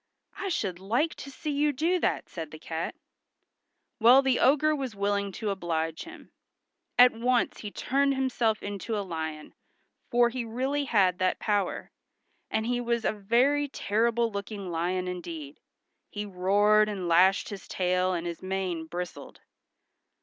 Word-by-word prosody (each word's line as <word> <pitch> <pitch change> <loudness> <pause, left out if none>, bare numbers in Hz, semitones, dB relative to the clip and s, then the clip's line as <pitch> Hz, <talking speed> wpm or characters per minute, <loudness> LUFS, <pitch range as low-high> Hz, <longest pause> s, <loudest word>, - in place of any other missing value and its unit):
"I 390 - -4
should 190 - -2
like 235 - 0
to 280 - -8
see 295 +2 -5
you 290 +1 +2
do 330 +6 +1
that," - - -1
said 165 -3 -7
the 155 - -10
cat. 160 +1 -4 1.0
Well, 245 +4 +7
the 265 -2 +2
ogre 305 +3 +4
was 265 -6 -4
willing 200 0 0
to 210 0 -2
oblige 165 -4 -2
him. 335 +1 -13 0.7
At 250 0 +8
once 245 +2 0
he 210 - -5
turned 275 +5 +1
himself 240 -5 0
into 205 +2 -3
a 200 - -2
lion, 160 -3 -5 0.6
for 240 0 +4
he 245 0 -3
really 265 +5 -1
had 190 -7 +2
that 185 0 +1
power, 205 -2 -1 0.6
and 220 - -1
he 245 +1 0
was 235 -1 -1
a - - +2
very 245 +8 +2
terrible 230 -1 0
looking 200 -2 -5
lion 180 +2 -1
indeed. 165 -5 -6 0.5
He 210 0 -5
roared 205 +3 +3
and 190 -4 -4
lashed 185 +3 +4
his 200 -2 -8
tail 185 0 +1
and 175 -2 -2
his 170 -1 -5
mane 185 -4 -3
bristled. 180 +1 -7
205 Hz, 155 wpm, -28 LUFS, 180-245 Hz, 1.0 s, At